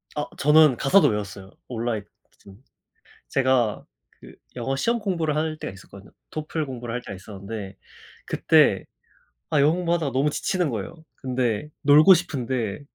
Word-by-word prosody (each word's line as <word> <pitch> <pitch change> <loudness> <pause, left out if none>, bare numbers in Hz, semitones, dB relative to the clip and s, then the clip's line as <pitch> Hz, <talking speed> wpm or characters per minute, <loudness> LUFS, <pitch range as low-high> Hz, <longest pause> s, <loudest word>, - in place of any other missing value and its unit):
어 150 - -3
저는 150 -2 +5
가사도 145 +3 +4
외웠어요, 100 -3 -4 0.2
올라잇 115 -3 -3 0.3
거진. 100 +5 -18 0.7
제가 130 -5 +1 0.4
그 - - -13 0.2
영어 130 +2 -2
시험공부를 185 - 0
할 155 0 -1
때가 95 - -6
있었거든요. 100 0 -14 0.2
토플 155 0 -4
공부를 120 -3 -6
할 125 - -3
때가 110 - -8
있었는데 100 +1 -8 0.5
그때 - - +3 0.7
아 145 - +3
영어 150 +3 +4
공부하다가 170 -6 -1
너무 140 +3 +1
지치는 180 -2 -1
거예요. 115 +8 -5 0.2
근데 125 -1 -2
놀고 150 +6 +7
싶은데 130 - -2
130 Hz, 325 characters per minute, -24 LUFS, 110-155 Hz, 0.7 s, 놀고